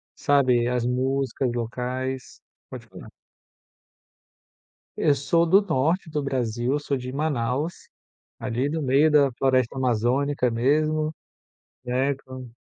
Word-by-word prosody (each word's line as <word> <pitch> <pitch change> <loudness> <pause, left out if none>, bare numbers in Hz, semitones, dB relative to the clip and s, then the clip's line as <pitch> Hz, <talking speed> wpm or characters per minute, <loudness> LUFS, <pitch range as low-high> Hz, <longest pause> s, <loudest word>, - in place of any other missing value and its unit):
sabe, 130 -4 +2
as 125 -1 0
músicas 130 +1 -1
locais, 125 +2 -4 0.3
pode - - -9
falar. - - -12 1.9
Eu 145 - +3
sou 165 +5 +2
do 190 +5 +5
norte 165 -1 0
do 150 -1 -2
Brasil. 125 0 -1
Sou 145 -1 -2
de 125 0 -6
Manaus, 145 +1 -2 0.5
ali 130 +3 -1
do 160 +1 -2
meio 140 +3 +3
da 145 -3 +4
floresta 130 0 +1
amazônica 125 +2 +1
mesmo, 155 +6 +1 0.7
né, 130 +3 0
como 130 -2 -10
130 Hz, 115 wpm, -24 LUFS, 125-145 Hz, 1.9 s, do